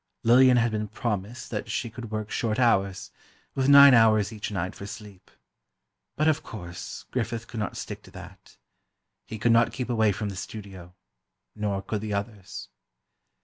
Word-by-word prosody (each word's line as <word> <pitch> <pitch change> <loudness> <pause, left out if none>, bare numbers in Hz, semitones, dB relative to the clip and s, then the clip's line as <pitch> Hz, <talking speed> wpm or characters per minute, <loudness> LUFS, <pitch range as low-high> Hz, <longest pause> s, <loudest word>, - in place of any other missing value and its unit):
Lillian 125 +2 +6
had 115 -1 +2
been 105 0 -2
promised 110 +1 -4
that - - -4
she - - -2
could 115 0 -8
work 110 -1 -4
short 110 -2 -1
hours, 100 -6 +1 0.4
with 135 0 +1
nine 140 -1 +10
hours 110 -2 +4
each 105 -1 -5
night 95 -3 -3
for 100 - -9
sleep. 105 -4 -11 0.9
But 155 - +1
of 155 0 +2
course, 90 -9 -8
Griffith 115 -2 -2
could 115 - -6
not 105 - -3
stick - - -6
to - - -17
that. - - -13 0.7
He 110 - -6
could 115 +2 +2
not 115 0 +4
keep 125 -2 -4
away 110 -3 +3
from 105 +1 -3
the 100 - -6
studio; 95 -2 -9 0.6
nor 100 -2 -2
could 105 0 -3
the 105 -1 -3
others. 100 -1 -6
110 Hz, 170 wpm, -26 LUFS, 100-120 Hz, 0.9 s, nine